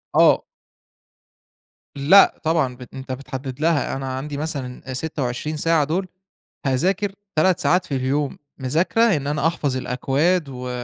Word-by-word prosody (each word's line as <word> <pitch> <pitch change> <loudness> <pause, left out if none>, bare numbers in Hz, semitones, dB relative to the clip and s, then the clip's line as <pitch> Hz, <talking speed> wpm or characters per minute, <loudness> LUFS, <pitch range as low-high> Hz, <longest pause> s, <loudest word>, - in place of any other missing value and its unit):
آه. - - +5 1.5
لأ 165 +9 +6
طبعًا 155 -6 +1
بن 125 0 -10
أنت 130 0 -7
بتحدّد 130 0 -6
لها. 155 -5 +1
أنا 135 0 -4
عندي 145 +1 -5
مثلًا 135 -4 -5
أ - - -3
26 150 +1 -3
ساعة 165 -1 +3
دول 180 +6 -1 0.6
هاذاكر 185 +9 +1 0.2
3 180 +3 +3
ساعات 180 +1 +2
في 140 - -3
اليوم 135 +2 -1 0.2
مذاكرة 160 - +1 0.2
إن 140 -1 -4
أنا 150 +2 +1
أحفظ 145 -5 -1
الأكواد 140 +6 0
و 125 -1 -6
145 Hz, 140 wpm, -22 LUFS, 130-165 Hz, 1.5 s, لأ